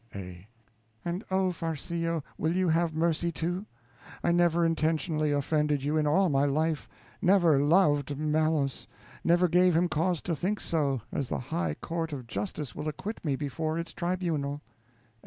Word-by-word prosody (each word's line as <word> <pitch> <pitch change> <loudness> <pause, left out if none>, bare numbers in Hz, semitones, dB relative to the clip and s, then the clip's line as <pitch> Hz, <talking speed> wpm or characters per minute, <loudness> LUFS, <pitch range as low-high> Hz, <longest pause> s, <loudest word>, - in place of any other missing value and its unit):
A. 90 -1 -8 0.6
And, 175 +4 -2
oh, 190 -1 +2
Farcillo, 165 0 -2
will 160 +2 0
you 185 -1 +2
have 165 0 +1
mercy, 170 +1 +1
too? 175 +5 -3 0.6
I - - +3
never 170 -1 +3
intentionally 155 -1 +1
offended 145 0 +1
you 145 +2 0
in 155 -1 +2
all 190 +6 +4
my 140 -3 +2
life, 155 +1 0 0.3
never 175 -6 +5
_loved 145 -1 +4
_Malos, 150 0 0 0.4
never 175 +1 +4
gave 180 0 +4
him 175 +1 +3
cause 165 +2 0
to 170 - -1
think 195 +6 -1
so, 140 -6 0
as 140 - -2
the - - -2
high 85 -10 -2
court 165 - -4
of 130 -4 -6
Justice 150 - -4
will 155 - -5
acquit 190 +9 -5
me 145 -5 0
before 155 +3 -2
its 170 0 -4
tribunal. 165 -5 -2
160 Hz, 155 wpm, -29 LUFS, 145-175 Hz, 0.6 s, never